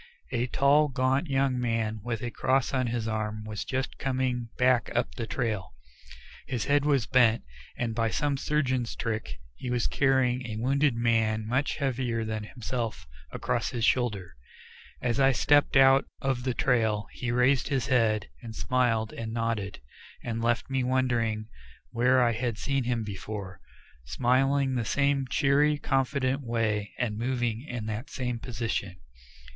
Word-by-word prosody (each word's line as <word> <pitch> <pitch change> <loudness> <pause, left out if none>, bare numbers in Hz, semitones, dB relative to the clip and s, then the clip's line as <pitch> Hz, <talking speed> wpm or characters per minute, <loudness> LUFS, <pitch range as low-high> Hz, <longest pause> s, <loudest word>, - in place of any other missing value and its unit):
A 125 -1 0
tall, 140 +4 +4
gaunt 135 +3 0
young 135 -2 +1
man 115 -2 -1
with 115 -1 -3
a 120 - -3
cross 130 +2 +1
on 130 -2 +1
his 115 -1 -2
arm 110 -1 -3
was 105 -1 -4
just 130 0 -3
coming 130 -3 -1
back 125 -2 +3
up - - 0
the 115 - -5
trail. 110 -8 -3 0.7
His 120 -4 -2
head 145 0 +2
was 140 -6 +2
bent, 120 -3 +3 0.3
and 115 -2 -1
by 115 0 +1
some 145 +5 0
surgeon's 130 -4 0
trick 110 -10 -3 0.2
he 125 - -6
was 120 -2 0
carrying 130 -2 +2
a 110 - -5
wounded 135 +3 +2
man 115 -2 +1
much 130 +5 0
heavier 125 -5 -1
than 110 -1 -3
himself 115 - -4 0.3
across 120 -1 -1
his 120 -2 -1
shoulders. 105 -10 0 0.7
As 125 +1 0
I 135 0 +5
stepped 145 +2 +3
out 135 0 +6
of 130 -2 -1
the 130 -2 0
trail 110 -5 +1
he 125 - -4
raised 125 +1 +3
his 135 -5 0
head, 115 -5 +2
and 115 -3 -8
smiled 115 -4 +1
and 115 -1 -5
nodded, 115 - -2 0.4
and 115 -1 -3
left 120 +1 +1
me 135 -1 0
wondering 120 -4 0 0.4
where 125 +2 +3
I 120 - +3
had 115 -1 -2
seen 135 +1 -1
him 120 -2 0
before, 100 -2 -6 0.4
smiling 135 - +2
in 130 - -1
the 120 - 0
same 140 +2 +1
cheery, 145 +3 +3
confident 135 -1 0
way 115 -4 -1
and 110 -4 -2
moving 120 -2 -1
in 120 -5 -4
that 110 +4 -4
same 125 -3 -3
position. 115 -6 -3
120 Hz, 160 wpm, -28 LUFS, 110-130 Hz, 0.7 s, out